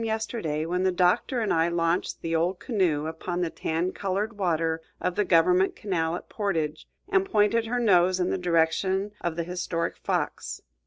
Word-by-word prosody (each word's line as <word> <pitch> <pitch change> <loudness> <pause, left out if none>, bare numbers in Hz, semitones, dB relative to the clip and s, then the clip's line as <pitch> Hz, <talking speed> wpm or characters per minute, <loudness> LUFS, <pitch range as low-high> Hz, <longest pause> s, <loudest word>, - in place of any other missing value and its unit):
yesterday 220 -9 -2
when 180 +2 -1
the 190 0 +2
Doctor 185 +8 +2
and 215 - +1
I 165 0 +3
launched 170 +1 -1
the 165 0 -1
old 175 +3 +1
canoe 175 - 0
upon 175 +3 -3
the 170 -2 -1
tan 165 +3 -1
colored 200 +4 -2
water 165 -4 0 0.2
of 180 - -1
the 210 - +1
government 180 +1 +3
canal 170 -5 -1
at - - -8
Portage, 160 -7 -2 0.2
and 385 -1 +3
pointed 225 - +2
her 245 +2 0
nose 185 -5 +4
in 180 - +1
the - - 0
direction 180 +3 +1
of 175 -2 -2
the 170 - -1
historic 170 -1 -2
Fox. - - -3
180 Hz, 175 wpm, -26 LUFS, 165-205 Hz, 0.2 s, nose